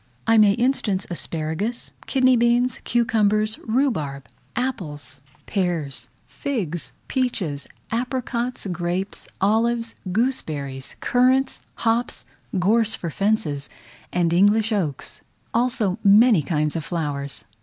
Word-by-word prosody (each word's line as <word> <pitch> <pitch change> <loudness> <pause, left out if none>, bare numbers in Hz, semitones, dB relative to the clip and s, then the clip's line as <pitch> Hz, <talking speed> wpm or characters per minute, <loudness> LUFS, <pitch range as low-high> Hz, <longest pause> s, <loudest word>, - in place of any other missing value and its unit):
I 225 -1 +5
may 205 -2 +6
instance 230 -5 0
asparagus, 170 +7 -2 0.2
kidney 255 -1 +4
beans, 240 +1 +2
cucumbers, 215 -2 +2
rhubarb, 220 - -1 0.3
apples, 150 - -4 0.2
pears, 175 -8 -1 0.2
figs, 190 - -1 0.2
peaches, 195 - 0 0.2
apricots, 245 0 -2
grapes, 175 +3 -3
olives, 230 +3 +1 0.2
gooseberries, 150 - -2
currants, 255 +2 +2
hops, 230 +1 0 0.3
gorse 220 +4 +3
for 170 - -5
fences, 195 -8 0 0.4
and 170 -2 +1
English 205 +5 +4
oaks; 165 -10 -2 0.3
also 230 -5 +1
many 210 -1 +6
kinds 150 0 0
of 165 - -2
flowers. 140 -8 -3
205 Hz, 100 wpm, -23 LUFS, 160-235 Hz, 0.4 s, may